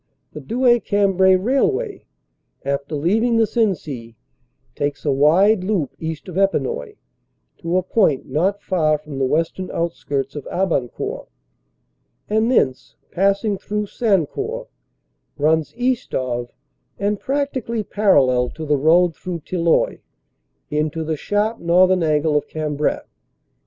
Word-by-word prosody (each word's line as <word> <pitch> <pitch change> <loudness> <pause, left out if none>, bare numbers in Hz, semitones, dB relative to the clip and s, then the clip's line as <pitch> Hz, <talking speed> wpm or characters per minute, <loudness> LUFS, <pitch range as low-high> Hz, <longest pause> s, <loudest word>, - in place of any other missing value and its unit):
The - - -7
Douai 240 +1 +3
Cambrai 195 -3 +3
railway, 395 - 0 0.6
after 140 +2 -2
leav 175 +10 +1
ing 235 -1 +2
the 225 - +4
Sensee, 155 - -2 0.6
takes 145 0 -3
a 145 - +2
wide 180 +9 +4
loop 185 -9 -1
east 160 +1 -5
of 185 0 -3
Epinoy, 440 - 0 0.6
to 170 +1 -1
a 185 - +1
point 185 - +1
not 180 +9 0
far 155 -5 +1
from 150 -2 -8
the 135 - +2
western 165 +6 -1
outskirts 145 -5 -3
of 145 - -6
Abancourt, 170 -10 -2 1.0
and 220 +2 +1
thence, 130 - +1 0.2
pass 195 +3 +1
ing 205 -3 -1
through 210 0 -3
Sancourt, 245 - -1 0.7
runs 155 +1 +1
east 250 0 -1
of 120 -2 -2 0.5
and 205 +1 -1
practically 265 -5 -2
parallel 130 -13 +3
to 160 - -7
the 150 -1 +2
road 165 +3 +4
through 175 -2 -6
Tilloy 170 +1 +1 0.7
into 155 +2 -1
the 160 0 -2
sharp 210 +8 -1
northern 180 +2 +4
angle 155 -1 +1
of 150 - +1
Cam 155 -2 -3
brai. 150 +1 0
180 Hz, 130 wpm, -20 LUFS, 150-210 Hz, 1.0 s, the